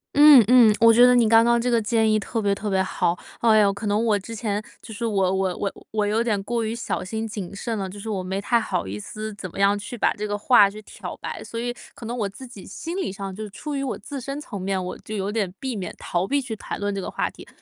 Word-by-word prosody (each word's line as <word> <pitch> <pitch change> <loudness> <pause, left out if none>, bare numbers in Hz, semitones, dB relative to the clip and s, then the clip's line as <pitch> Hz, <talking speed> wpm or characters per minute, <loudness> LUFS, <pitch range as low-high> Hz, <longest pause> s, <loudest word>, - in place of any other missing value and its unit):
嗯， 290 -4 +9
嗯， 240 -3 +7
我 230 0 +7
觉 240 - +7
得 250 0 +7
你 235 -2 +4
刚 225 +1 +6
刚 235 0 +3
这 245 +1 0
个 230 -1 +3
建 220 0 +2
议 215 - +3
特 225 +3 -3
别 200 -2 +1
特 205 +1 -4
别 190 -1 +2
好。 175 -1 0 0.2
哎 225 -2 +5
哟， 200 -1 +4
可 205 +1 -5
能 210 +3 +1
我 210 -2 +3
之 230 +4 -8
前， 210 -1 -2 0.2
就 220 - -10
是 210 - -6
我 190 -3 +1
我 190 -1 0
我 200 - -2 0.2
我 210 -1 0
有 220 +3 +1
点 210 -4 0
过 235 +1 -1
于 220 +1 -2
小 235 - -3
心 220 +4 -4
谨 205 -4 -6
慎 230 +3 -3
了， 190 - -3
就 200 +2 -9
是 220 - -8
我 200 -4 -2
没 190 +1 -3
太 235 +4 +2
好 185 - -2
意 100 +2 -5
思 215 - -6
怎 190 -2 -7
么 - - -12
样 200 +1 +3
去 210 +4 -7
把 - - +2
这 210 +1 -4
个 205 0 -2
话 205 -2 +5
去 210 +1 -10
挑 - - -8
白， - - -6
所 230 - -6
以 240 +1 -2 0.2
可 230 - -10
能 235 - -4
我 210 -5 -1
自 255 +6 -11
己 210 -6 -12
心 335 - -6
理 380 - -2
上， 195 -1 -6
就 215 0 -6
出 295 +8 -6
于 275 - -1
我 265 - -3
自 285 -4 -7
身 275 +3 -5
层 205 -10 -7
面， 190 -1 -1
我 - - -5
就 215 - -7
有 200 0 -2
点 210 -5 -1
避 265 -3 -3
免 185 -4 -5
逃 175 +2 -2
避 285 +5 +1
去 240 -5 -5
谈 - - -6
论 205 0 -1
这 195 - -3
个 - - -5
话 - - -1
题。 - - -14
215 Hz, 310 characters per minute, -24 LUFS, 200-235 Hz, 0.2 s, 嗯